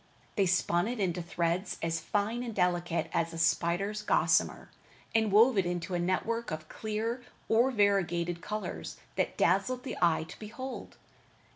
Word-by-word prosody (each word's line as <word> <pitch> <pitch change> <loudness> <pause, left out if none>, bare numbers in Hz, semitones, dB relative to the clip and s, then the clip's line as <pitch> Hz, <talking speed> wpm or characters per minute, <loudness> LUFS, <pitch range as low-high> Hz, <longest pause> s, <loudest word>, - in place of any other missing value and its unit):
They 195 -2 +3
spun 175 0 +2
it 245 0 -3
into 180 -3 0
threads 170 +2 -1
as 165 0 0
fine 210 +8 -1
and 235 -3 -5
delicate 175 -2 +1
as 165 0 0
a - - -6
spider's 175 +5 +1
gossamer, 210 - +2 0.4
and 220 -2 +2
wove 220 +2 +6
it 190 - +1
into 175 +1 -3
a 175 - +1
network 225 +6 -1
of 155 0 -5
clear 220 +5 -3 0.3
or 235 +4 +4
variegated 175 -6 +1
colors 215 +3 -5 0.2
that - - -1
dazzled 250 -1 +2
the 265 - -5
eye 170 -2 +3
to 160 - -11
behold. 245 +5 -7
195 Hz, 155 wpm, -30 LUFS, 170-220 Hz, 0.4 s, wove